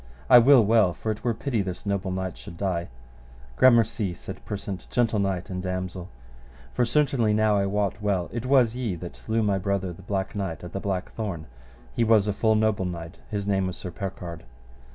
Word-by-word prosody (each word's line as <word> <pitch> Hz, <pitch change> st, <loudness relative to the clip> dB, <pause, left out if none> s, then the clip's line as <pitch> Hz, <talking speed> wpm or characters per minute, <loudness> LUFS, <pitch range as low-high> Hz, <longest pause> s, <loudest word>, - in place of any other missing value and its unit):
I 125 Hz, -, +11 dB
will 125 Hz, -1 st, +7 dB
well, 105 Hz, -4 st, +4 dB
for 110 Hz, -, -2 dB
it 110 Hz, -, -6 dB
were 120 Hz, -2 st, 0 dB
pity 120 Hz, -2 st, -1 dB
this 95 Hz, 0 st, -5 dB
noble 100 Hz, -2 st, -1 dB
knight 95 Hz, 0 st, -3 dB
should 85 Hz, -, -11 dB
die. 90 Hz, -3 st, -1 dB, 0.7 s
Gramercy, 115 Hz, -, +4 dB
said -, -, -9 dB
Persant, 100 Hz, -3 st, -5 dB
gentle 115 Hz, -3 st, +1 dB
knight 95 Hz, -2 st, -1 dB
and 90 Hz, 0 st, -3 dB
damosel. 90 Hz, 0 st, -4 dB, 0.6 s
For 120 Hz, -, +2 dB
certainly 120 Hz, -5 st, +2 dB
now 110 Hz, -1 st, +3 dB
I 100 Hz, -1 st, +1 dB
wot 100 Hz, +1 st, -1 dB
well 100 Hz, -4 st, 0 dB
it 120 Hz, +1 st, -3 dB
was 125 Hz, -4 st, +4 dB
ye 120 Hz, -7 st, -2 dB
that 85 Hz, +1 st, -8 dB
slew 110 Hz, 0 st, -1 dB
my 100 Hz, -2 st, +1 dB
brother 95 Hz, -1 st, -1 dB
the 85 Hz, -, -13 dB
Black 95 Hz, 0 st, -3 dB
Knight 95 Hz, -6 st, -4 dB
at 90 Hz, -, -8 dB
the 95 Hz, -, -2 dB
black 95 Hz, -2 st, -3 dB
thorn; 95 Hz, -8 st, -4 dB, 0.5 s
he -, -, +2 dB
was 110 Hz, -2 st, +4 dB
a 105 Hz, -, +1 dB
full 110 Hz, +2 st, +2 dB
noble 110 Hz, -3 st, +1 dB
knight, 85 Hz, -2 st, -6 dB
his 100 Hz, -3 st, -3 dB
name 95 Hz, -2 st, +1 dB
was 90 Hz, -, -5 dB
Sir 90 Hz, -, -7 dB
Percard. 85 Hz, -2 st, -6 dB
100 Hz, 200 wpm, -26 LUFS, 90-110 Hz, 0.7 s, I